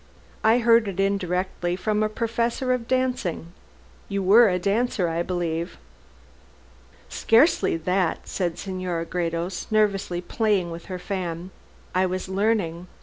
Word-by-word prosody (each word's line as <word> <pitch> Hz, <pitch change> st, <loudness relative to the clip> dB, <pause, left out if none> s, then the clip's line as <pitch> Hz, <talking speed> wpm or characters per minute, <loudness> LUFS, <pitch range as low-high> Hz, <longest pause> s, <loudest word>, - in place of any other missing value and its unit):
"I 225 Hz, +2 st, +5 dB
heard 230 Hz, -2 st, +4 dB
it 195 Hz, -1 st, -5 dB
indirectly 185 Hz, -2 st, -1 dB
from 210 Hz, +3 st, -1 dB
a 215 Hz, -, +1 dB
professor 235 Hz, +3 st, -1 dB
of 240 Hz, -2 st, -3 dB
dancing. 245 Hz, -10 st, -1 dB, 0.6 s
You 200 Hz, -1 st, -1 dB
were 215 Hz, +4 st, +7 dB
a 180 Hz, -, +1 dB
dancer, 200 Hz, 0 st, 0 dB
I 165 Hz, +1 st, -1 dB
believe?" 170 Hz, -2 st, -3 dB, 1.3 s
"Scarcely 230 Hz, -, +3 dB
that," 180 Hz, +1 st, -1 dB
said 175 Hz, -3 st, -2 dB
Senora 185 Hz, -3 st, -3 dB
Gredos, 170 Hz, +1 st, -3 dB
nervously 200 Hz, -5 st, +1 dB
playing 195 Hz, -2 st, 0 dB
with 165 Hz, 0 st, -8 dB
her 185 Hz, -, -5 dB
fan; 180 Hz, -2 st, -4 dB, 0.4 s
"I 185 Hz, +1 st, +2 dB
was 185 Hz, +1 st, -3 dB
learning. 190 Hz, -3 st, 0 dB
190 Hz, 130 wpm, -24 LUFS, 175-215 Hz, 1.3 s, were